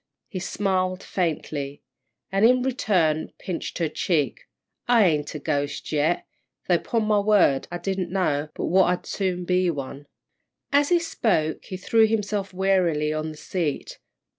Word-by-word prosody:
He 190 - -5
smiled 185 -1 -1
faintly, 150 -5 -3 0.5
and, 195 +1 +1
in 250 +2 +5
return, 190 - +1
pinched 180 -3 -5
her 165 - +1
cheek. 150 -4 -1 0.4
"I 235 -4 +5
ain't 150 -3 0
a - - -1
ghost 145 -2 -2
yet, 155 +3 +1 0.4
though 175 -2 +3
'pon 230 -2 -1
my 210 -1 +3
word 200 -10 +3
I 175 - -3
didn't 190 -1 -2
know 155 -6 0
but - - -3
what 185 +2 +4
I'd 180 0 -1
soon 180 -3 -2
be 180 0 +2
one." 140 -2 -5 0.6
As 285 0 +3
he 350 - +5
spoke, 205 - 0
he 185 - -6
threw 220 +4 +3
himself 210 -2 -1
wearily 180 -5 +1
on 155 0 -2
the 155 - -9
seat. 160 -3 -3
180 Hz, 155 wpm, -24 LUFS, 155-200 Hz, 0.6 s, in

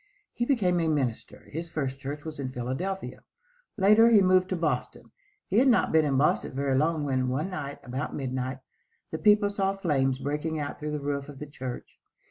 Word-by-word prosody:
He 240 - -1
became 195 -10 +2
a 165 - +1
minister. 135 -7 -2
His 165 +2 -5
first 135 -4 -3
church 145 +2 -6
was 155 -2 -7
in 130 -2 -3
Philadelphia. 130 +11 -4 0.6
Later 215 +3 +6
he 225 -3 +7
moved 185 -1 +4
to 185 - 0
Boston. 165 -3 -3 0.4
He 200 - +3
had 265 - +4
not 245 - +3
been 160 -1 +4
in 140 -2 +1
Boston 145 0 +1
very 140 -1 0
long 155 +2 +1
when, 130 -2 0
one 150 +9 -2
night, 145 -5 -5
about 130 +4 -4
midnight, 130 0 -3 0.5
the 160 - -3
people 210 -1 +4
saw 195 -1 0
flames 135 -8 +1
breaking 150 +3 -2
out 145 -1 -4
through 150 0 -4
the 150 - -2
roof 140 0 -3
of 145 - -10
the 150 - -6
church. 130 -4 -8
150 Hz, 195 wpm, -27 LUFS, 135-185 Hz, 0.6 s, he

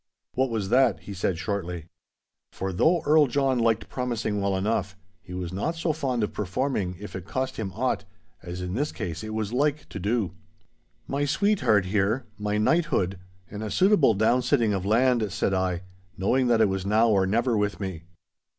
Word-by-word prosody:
'What 130 +1 +1
was 110 -4 -2
that?' 125 -9 +3
he 100 +3 -8
said 90 -2 -1
shortly. 90 -4 -3 0.7
For 95 0 -4
though 165 - +3
Earl 150 -1 +5
John 135 0 +1
liked 115 -1 +1
promising 115 -5 -2
well 100 -1 +1
enough, 100 -1 -1 0.2
he 90 -1 -9
was 90 -1 -4
not 130 - -1
so 165 -1 0
fond 130 -7 -1
of 105 - -2
performing 105 -2 -1
if 105 - -8
it 95 -2 -6
cost 130 +3 -2
him 100 -4 -3
aught, 125 +4 0 0.4
as 90 +1 -6
in 90 0 -4
this 145 +8 -1
case 85 +4 -5
it 110 - -5
was 110 0 -2
like 145 +3 0
to - - -6
do. 105 0 0 0.8
'My 140 +1 0
sweetheart 145 - +2
here, 105 +6 0
my 105 0 -1
knighthood, 105 - +1 0.3
and 105 +1 -6
a 110 - -3
suitable 170 - +4
down 110 +5 +3
sitting 125 -4 +2
of 95 -1 -2
land,' 115 -1 +3
said 95 - 0
I, 95 -1 0 0.3
knowing 125 +7 +2
that 115 -2 +4
it 110 - +5
was 95 -1 -2
now 110 +4 +3
or 95 -3 +3
never 115 +4 +1
with 105 -1 0
me. 95 -5 -5
110 Hz, 185 wpm, -26 LUFS, 95-130 Hz, 0.8 s, Earl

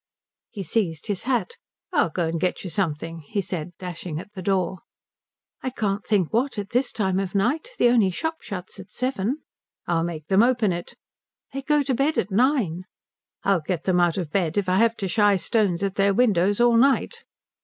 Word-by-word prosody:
He 205 -4 -6
seized 165 -4 -1
his 205 -2 -3
hat. 265 - -1 0.4
"I'll 290 - +3
go 170 0 -1
and 165 0 -2
get 180 - -1
you 185 - -4
something," 165 -1 -2
he 165 +7 -4
said, 180 -2 -4
dashing 175 -3 -6
at 205 +4 -11
the 190 - -7
door. 190 -1 0 0.8
"I 260 - -2
can't 205 -5 -2
think 200 -5 +1
what, 245 +2 +1
at 200 -1 -4
this 250 +2 +1
time 190 -4 0
of 195 -2 -3
the - - +1
night. 285 - 0
The 240 - +5
only 230 -5 +4
shop 320 - -3
shuts 190 -1 -7
at 195 - -11
seven." 255 +2 -2 0.4
"I'll 165 -1 +1
make 165 -3 -4
them 190 +5 +4
open 235 -5 +3
it." 170 0 -6 0.6
"They 275 - -3
go 295 +1 +2
to 270 -1 0
bed 275 +6 +1
at 200 - 0
nine." 205 - +1 0.6
"I'll 195 -4 +2
get 165 +1 -3
them 185 -2 +2
out 175 0 +2
of 170 -6 -3
bed 175 -3 0
if 200 -2 +1
I 185 +1 +2
have 230 0 +3
to 195 - -2
shie 205 +1 +4
stones 195 -2 +1
at 195 -1 0
their 200 0 +2
windows 205 -4 +3
all 240 -1 +5
night." 270 +3 +2
195 Hz, 205 wpm, -24 LUFS, 180-235 Hz, 0.8 s, The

